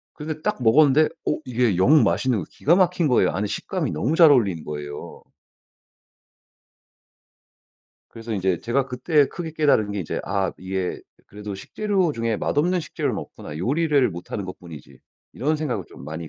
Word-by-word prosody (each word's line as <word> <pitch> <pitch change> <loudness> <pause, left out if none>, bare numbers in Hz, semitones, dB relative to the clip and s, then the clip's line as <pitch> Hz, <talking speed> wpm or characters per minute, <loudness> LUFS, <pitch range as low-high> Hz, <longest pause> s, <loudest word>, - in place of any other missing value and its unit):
근데 155 0 -6
딱 210 -11 -2
먹었는데 145 +5 +5 0.2
어 - - +1
이게 120 -5 +1
영 135 - +5
맛있는 105 +8 +1
거 90 - -4
기가 170 +5 +2
막힌 180 -3 +2
거예요. 120 -8 +3
아니 105 +2 -2
식감이 - - -3
너무 120 - -1
잘 165 -3 +8
어울리는 100 - +2
거예요. 75 -1 -7 2.9
그래서 115 0 -7
인제 95 -4 0
제가 130 +3 0
그때 140 +3 +2
크게 165 0 -7
깨달은 145 -10 +2
게 100 - -3
이제 85 - -4
'아 95 0 -1
이게 95 0 -3 0.3
그래도 105 0 -8
식재료 190 - -1
중에 115 -3 -1
맛없는 175 - 0
식재료는 155 - -3
없구나. 75 - -9
요리를 140 - +2
못하는 90 +3 -6
것뿐이지.' 85 -4 -11 0.3
이런 155 +4 0
생각을 130 - -3
좀 65 - -12
많이 80 +3 -6
120 Hz, 345 characters per minute, -23 LUFS, 95-155 Hz, 2.9 s, 잘